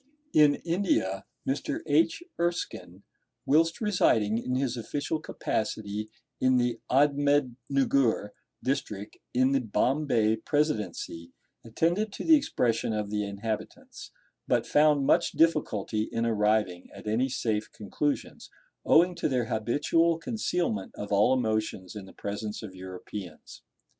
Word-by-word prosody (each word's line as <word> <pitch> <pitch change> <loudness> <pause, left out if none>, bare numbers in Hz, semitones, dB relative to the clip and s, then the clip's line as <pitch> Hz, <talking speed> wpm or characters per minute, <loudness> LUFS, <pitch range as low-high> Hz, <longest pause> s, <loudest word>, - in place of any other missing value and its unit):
In 150 -1 +6
India 165 - 0 0.2
Mr. 285 - -2
H. 330 +1 +2 0.2
Erskine, 110 - -3 0.4
whilst 165 +6 +3
residing 115 - +2
in 125 +1 -2
his 130 -2 0
official 145 +6 -3
capacity 110 -7 -3 0.3
in 130 0 +3
the 120 -1 0
Admednugur 135 -4 +2 0.3
District 110 -7 -3 0.2
in 130 +1 +4
the 135 - +3
Bombay 115 -1 +1
Presidency, 110 - -2 0.3
attended 170 - 0
to - - -5
the 320 - +7
expression 115 - 0
of 105 -1 -3
the 105 0 0
inhabitants, 105 +2 -6 0.4
but - - +2
found 150 -2 +4
much - - +3
difficulty 110 -10 +1
in 115 0 -1
arriving 105 -5 +1
at - - -11
any 115 +5 +1
safe 110 -4 -2
conclusions, 140 +7 -3 0.3
owing 180 +3 +5
to 170 - -1
their 125 -3 0
habitual 150 +9 +2
concealment 175 - -2
of 105 0 -6
all 105 +4 +4
emotions 110 -6 -1
in 100 -2 -7
the - - -14
presence 105 +2 -5
of 100 -4 -8
Europeans. 95 -1 -9
120 Hz, 125 wpm, -28 LUFS, 105-150 Hz, 0.4 s, the